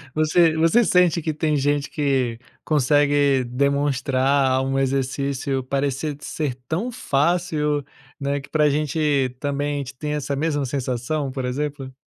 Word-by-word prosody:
Você 160 +1 +3
você 165 +9 +4
sente 180 -3 +3
que 155 -1 -2
tem 155 -1 0
gente 145 +1 0
que 130 -5 0 0.3
consegue 145 -2 +3
demonstrar 135 0 +1
um 135 0 -1
exercício 135 0 -1
parecer 140 +2 -2
ser 145 -5 -3
tão 215 +10 -2
fácil, 150 -2 0 0.4
né, 140 0 -1
que 135 - -13
para 155 - +1
a 150 - +4
gente 145 -3 0
também 145 0 -1
a - - -2
gente 135 -1 -6
tem 150 +1 -3
essa 140 -1 -2
mesma 145 -1 0
sensação, 130 +2 -2
por 130 -1 -4
exemplo? 135 +1 -3
145 Hz, 145 wpm, -22 LUFS, 135-150 Hz, 0.4 s, você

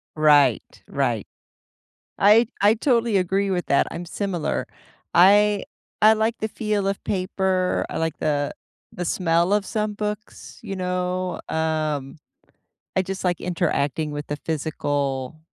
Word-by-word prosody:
Right, 145 -5 +3
right. 120 -7 -1 0.9
I 215 +3 +6
I 205 +2 +5
totally 235 -2 +1
agree 195 +2 +1
with 180 -2 -1
that, 140 - +3
I'm 175 - -6
similar, 180 -2 -2 0.5
I 205 +2 +5 0.4
I 215 +1 +7
like 220 +2 0
the 220 - -2
feel 210 -2 -2
of 195 0 -2
paper. 185 -1 0
I - - -4
like 160 -1 -2
the 145 -2 0 0.4
the 175 - -4
smell 170 +1 +1
of 205 -1 +1
some 215 -1 -2
books, 210 0 -6
you 195 -4 -5
know, 180 -1 -2
um, 155 -3 -1 0.8
I 190 - +3
just 190 +1 -5
like 180 -2 0
interacting 155 -4 -1
with 145 0 -6
a - - 0
physical 145 -3 -2
180 Hz, 135 wpm, -23 LUFS, 155-205 Hz, 0.9 s, I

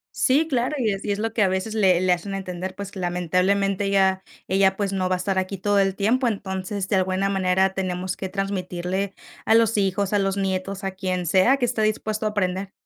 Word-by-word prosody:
Sí, 285 +5 +3
claro, 255 +2 0
y 230 -5 +1
es 195 0 -5
y 205 - -1
es 200 - -5
lo 225 +1 -1
que 225 - 0
a 195 - +5
veces 190 +4 -2
le 190 -5 +3
le 185 -1 +2
hacen 180 +3 -1
entender, 185 -1 -5
pues, 200 0 -7
lamentablemente, 185 +3 0
ella 190 -1 +2 0.3
ella, 190 0 +3
pues, 200 -1 -2
no 185 -2 0
va 185 - +1
a - - -2
estar 190 +1 -2
aquí 190 +1 -3
todo 205 +2 +1
el 195 -1 +1
tiempo, 240 +6 +1
entonces, 190 -2 -3
de 195 - +2
al 185 - +2
buena 190 +1 0
manera 190 0 +2
tenemos 185 -1 -3
que 190 - -4
transmitirle 190 0 -3 0.3
a 220 - +4
los 225 -1 +3
hijos, 195 0 0
a 205 - +2
los 195 0 0
nietos, 195 0 -2
a 195 - -2
quien 185 -1 -3
sea 190 - +4
que 255 - -4
esté 240 -2 -1
dispuesto 215 0 -1
a - - +2
aprender. 190 -1 -2
195 Hz, 230 wpm, -23 LUFS, 185-205 Hz, 0.3 s, a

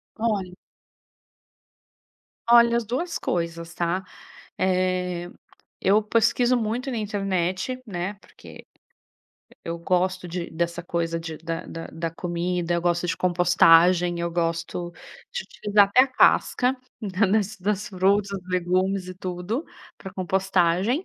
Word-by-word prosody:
Olha 200 -5 -2 1.9
Olha, 235 0 +6
as 235 - -2
duas 330 +10 -3
coisas, 170 -1 -3
tá? 175 +2 -1 0.6
Eh, 180 -1 0 0.5
eu 205 +3 +4
pesquiso 230 +3 +2
muito 240 +3 -2
na 245 - -3
internet, 195 +2 -2
né, 185 0 -4
porque 200 - -15 1.0
eu 170 0 -3
gosto 180 +1 0
de 175 0 -4
dessa 170 +1 -2
coisa 165 -1 -2
de 165 -1 -6
da 165 +1 -5
da 165 - -7
da 165 0 -4
comida, 175 0 -2
eu 170 - 0
gosto 175 0 0
de 165 - 0
compostagem, 175 0 +4
eu 170 0 -1
gosto 170 +1 -2 0.4
de 485 -1 -3
utilizar 205 -1 +2
até 250 +6 +6
a - - +2
casca 255 0 +3 0.2
da 200 -1 +1
da 210 +3 +3 0.2
das 205 +2 -1
frutas, 195 +2 +2
dos 180 0 -17
legumes 185 +1 0
e 185 - -7
tudo, 185 - -4 0.3
pra 190 - -10
compostagem. 190 - +1
185 Hz, 130 wpm, -24 LUFS, 175-210 Hz, 1.9 s, Olha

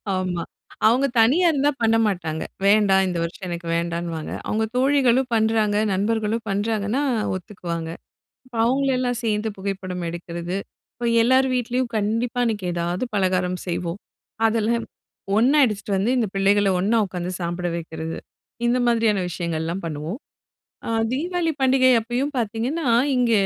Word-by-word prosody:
ஆமா. 180 -2 -2 0.4
அவங்க 255 +5 +4
தனியா 280 +11 +4
இருந்தா 290 0 +2
பண்ண 225 0 +3
மாட்டாங்க. 160 -5 -2 0.2
வேண்டா 200 -1 +5
இந்த 175 -2 -2
வருஷம் 170 +3 -6
எனக்கு 170 0 -5
வேண்டான்னுவாங்க. 170 -1 -3 0.2
அவங்க 220 +1 0
தோழிகளும் 260 -1 +3
பண்றாங்க, 220 -2 +2 0.2
நண்பர்களும் 220 +3 0
பண்றாங்கன்னா 210 +5 0 0.3
ஒத்துக்குவாங்க. 170 -3 -5 0.7
அவங்கள 270 +4 +2
எல்லாம் 245 -2 -1
சேர்ந்து 215 0 0
புகைப்படம் 190 -2 -4
எடுக்கிறது, 170 +1 -5 0.4
அப்ப 240 0 -2
எல்லார் 260 +2 +4
வீட்லயும் 245 0 -1
கண்டிப்பா 225 +4 -1
அன்னைக்கு 210 -5 -1
ஏதாவது 175 +6 -1
பலகாரம் 185 -2 +1
செய்வோம். 175 +1 -3 0.5
அதெல்லாம் 225 +1 0 0.5
ஒண்ணா 255 +7 +4
எடுத்துட்டு 205 -2 -2
வந்து 215 +6 +1
இந்த 230 - +2
பிள்ளைகள 200 +1 +3
ஒண்ணா 220 +5 +2
உக்காந்து 180 0 -4
சாப்பிட 175 +1 -2
வெக்கிறது, 160 -1 -5 0.5
இந்த 245 +1 +2
மாதிரியான 225 -5 +2
விஷயங்கள்லாம் 170 +1 -3
பண்ணுவோம். 160 - -4 0.7
அ, - - -2 0.2
தீவாளி 330 +4 0
பண்டிகை 260 -1 +5
அப்பயும் 250 +6 -2
பார்த்தீங்கன்னா, 240 +7 -1 0.3
இங்க 245 -2 +2
210 Hz, 130 wpm, -23 LUFS, 180-240 Hz, 0.7 s, வேண்டா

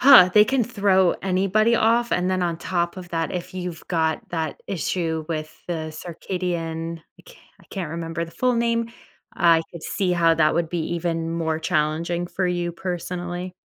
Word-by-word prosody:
huh, 250 -9 +9
they 210 0 +7
can 260 -3 +2
throw 195 -5 +3
anybody 195 +5 +2
off, 235 +2 +3
and 180 +1 +1
then 185 -1 +1
on 170 -2 0
top 175 0 -1
of 180 -1 -9
that, 165 -1 -1
if 180 +1 -4
you've 180 -3 -6
got 160 -2 0
that 160 -3 -3
issue 165 -3 -2
with 155 -1 -4
the 160 -3 -3
Circadian 165 -1 -4 0.2
I - - -17
ca - - -15 0.2
I - - -19
can't 180 -6 -4
remember 165 0 -3
the 165 - -12
full 250 +7 +1
name, 230 0 +1 0.4
I 165 -2 +4
could 170 -2 -10
see 185 +1 0
how 165 -2 +4
that 155 -1 +3
would 170 -1 0
be 175 - -1 0.2
even 165 -1 -1
more 160 -1 -1
challenging 165 +2 0
for 185 +1 -1
you, 175 -1 -1
personally. 175 0 -4
175 Hz, 180 wpm, -23 LUFS, 165-185 Hz, 0.4 s, huh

